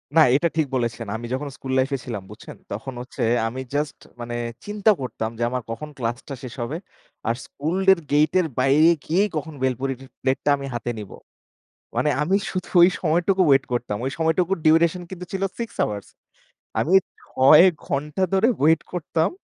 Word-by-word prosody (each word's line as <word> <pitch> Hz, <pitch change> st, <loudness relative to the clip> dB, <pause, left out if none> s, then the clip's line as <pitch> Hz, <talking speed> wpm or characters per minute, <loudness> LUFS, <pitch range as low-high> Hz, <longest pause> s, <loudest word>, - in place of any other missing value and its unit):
না, 160 Hz, -, +8 dB
এটা 170 Hz, +4 st, +3 dB
ঠিক 155 Hz, -3 st, +2 dB
বলেছেন। 115 Hz, -2 st, -2 dB
আমি 120 Hz, +1 st, -5 dB
যখন 145 Hz, +2 st, -2 dB
school 130 Hz, -1 st, -5 dB
life-এ 135 Hz, +1 st, +1 dB
ছিলাম 105 Hz, -6 st, -5 dB
বুঝছেন, -, -, -11 dB, 0.2 s
তখন 115 Hz, +6 st, -5 dB
হচ্ছে 125 Hz, +1 st, -8 dB, 0.3 s
আমি 130 Hz, +3 st, -5 dB
just 145 Hz, 0 st, -1 dB, 0.2 s
মানে 120 Hz, 0 st, -5 dB, 0.3 s
চিন্তা 210 Hz, +1 st, +2 dB
করতাম 110 Hz, -3 st, -3 dB
যে, 120 Hz, -, -1 dB
আমার 125 Hz, 0 st, -2 dB
কখন 150 Hz, +7 st, -6 dB
class-টা 120 Hz, +3 st, -4 dB
শেষ 125 Hz, -, -7 dB
হবে, 140 Hz, +8 st, -3 dB, 0.5 s
আর 115 Hz, -, +2 dB
school-এর 185 Hz, +5 st, +2 dB
gate-এর 155 Hz, +4 st, +3 dB
বাইরে 145 Hz, +5 st, +5 dB, 0.2 s
গিয়েই 195 Hz, +6 st, +2 dB
কখন 155 Hz, +1 st, -5 dB
বেলপুরিরির 130 Hz, +1 st, -2 dB
plate-টা 135 Hz, +2 st, 0 dB
আমি 140 Hz, -, -6 dB
হাতে 120 Hz, 0 st, -2 dB
নিব। 100 Hz, -3 st, -9 dB, 0.8 s
মানে 150 Hz, -, +2 dB
আমি 185 Hz, +6 st, +2 dB, 0.2 s
শুধু 185 Hz, -1 st, -4 dB
ওই 175 Hz, -, +8 dB
সময়টুকু 175 Hz, +3 st, +2 dB
wait 135 Hz, 0 st, +4 dB
করতাম। 115 Hz, -4 st, -2 dB
ওই 135 Hz, -, -1 dB
সময়টুকু 165 Hz, +3 st, +1 dB
duration 165 Hz, +3 st, +4 dB
কিন্তু 180 Hz, -1 st, -7 dB
ছিল 195 Hz, 0 st, -1 dB, 0.2 s
6 230 Hz, -2 st, -3 dB
hours। 105 Hz, -1 st, -4 dB, 0.7 s
আমি 180 Hz, +5 st, +1 dB, 0.3 s
৬ 145 Hz, +6 st, +6 dB, 0.2 s
ঘণ্টা 150 Hz, +5 st, -2 dB
ধরে 210 Hz, +5 st, +4 dB, 0.2 s
wait 160 Hz, 0 st, +5 dB
করতাম 165 Hz, -2 st, 0 dB
145 Hz, 165 wpm, -23 LUFS, 125-170 Hz, 0.8 s, না